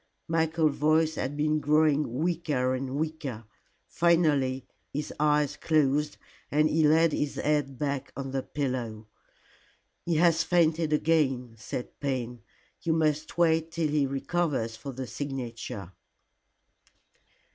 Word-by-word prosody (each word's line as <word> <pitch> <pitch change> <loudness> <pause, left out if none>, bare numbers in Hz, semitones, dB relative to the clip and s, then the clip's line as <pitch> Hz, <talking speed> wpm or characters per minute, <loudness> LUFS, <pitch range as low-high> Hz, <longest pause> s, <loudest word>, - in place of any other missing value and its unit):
Michael's 160 -2 +1
voice 155 +1 +3
had 145 0 -3
been 155 +1 +1
growing 150 -2 +2
weaker 150 -3 0
and 130 +1 -3
weaker. 150 -6 -3 0.4
Finally 150 -6 +2 0.3
his 150 +2 -4
eyes 150 -1 +2
closed, 150 -1 +1 0.3
and 150 +1 +3
he 155 0 +3
laid 160 +2 +4
his 145 -1 -1
head 145 -3 0
back 140 -1 -2
on 135 -1 -4
the 135 0 -1
pillow. 125 -7 -3 1.0
"He 170 - 0
has 165 0 +4
fainted 165 -2 +2
again," 140 -6 +1
said 115 +2 -7
Payne. 125 -4 -3 0.4
"You 165 - +1
must 155 -1 0
wait 165 -1 +3
till 165 -2 -1
he 145 -2 +2
recovers 135 -4 -1
for 140 +4 -7
the 130 0 -5
signature." 120 -8 -5
150 Hz, 125 wpm, -28 LUFS, 130-160 Hz, 1.0 s, laid